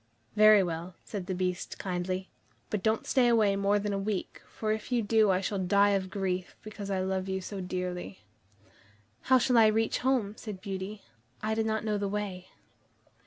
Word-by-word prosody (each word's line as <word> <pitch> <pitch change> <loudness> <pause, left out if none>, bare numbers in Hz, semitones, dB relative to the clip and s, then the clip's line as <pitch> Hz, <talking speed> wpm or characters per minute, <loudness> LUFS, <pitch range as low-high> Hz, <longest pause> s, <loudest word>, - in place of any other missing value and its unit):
"Very 215 -1 +7
well," 170 +1 -4
said 195 -4 -6
the 190 - -2
Beast 180 0 -2
kindly, 185 0 -3 0.4
"but 210 - -1
don't 220 +2 +1
stay 255 -3 +3
away 220 -4 +4
more 200 +1 +2
than 205 0 -2
a 195 - -1
week, 195 -1 -3
for 215 -1 -3
if 215 +3 -3
you 240 -2 +2
do, 215 0 +3
I 185 0 +2
shall 195 0 -2
die 200 +2 +4
of 190 -1 0
grief, 185 -2 -3
because 210 -2 -7
I 190 -1 0
love 190 0 -2
you 190 0 -1
so 195 +1 -6
dearly." 180 - -4 1.1
"How 260 - +7
shall 250 -1 +3
I 220 - +7
reach 220 +1 +1
home?" 250 -6 +1
said 210 -4 -7
Beauty; 195 +1 -6 0.4
"I 215 0 0
do 220 0 +1
not 220 0 -1
know 210 -1 0
the 200 - -1
way." 195 -3 -4
200 Hz, 190 wpm, -29 LUFS, 185-215 Hz, 1.1 s, Very